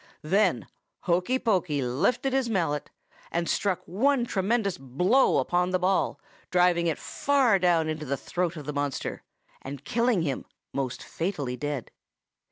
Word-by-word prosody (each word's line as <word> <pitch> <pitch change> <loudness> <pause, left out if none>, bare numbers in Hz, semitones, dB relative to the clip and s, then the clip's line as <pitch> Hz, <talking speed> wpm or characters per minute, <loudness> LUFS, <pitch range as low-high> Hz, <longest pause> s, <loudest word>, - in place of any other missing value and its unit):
"Then 185 - +2 0.4
Hokey 180 +8 +1
Pokey 180 - +1
lifted 195 - 0
his 265 -3 +1
mallet 165 -8 -1 0.4
and 170 0 -1
struck 195 -3 0
one 250 +7 +2
tremendous 200 -1 0
blow 180 - +3
upon 175 +7 +1
the 185 - +2
ball, 185 +1 +1 0.3
driving 175 -1 +3
it 160 - 0
far 265 -8 +2
down 175 -3 +3
the 155 -3 -2
throat 175 +2 -2
of 150 - -7
the 150 - -4
monster, 145 -1 -3 0.4
and 140 +1 -8
killing 230 -6 +2
him 140 -4 -3 0.3
most 135 -3 -3
fatally 155 -8 -3
dead. 145 -2 -4
175 Hz, 140 wpm, -27 LUFS, 145-205 Hz, 0.4 s, blow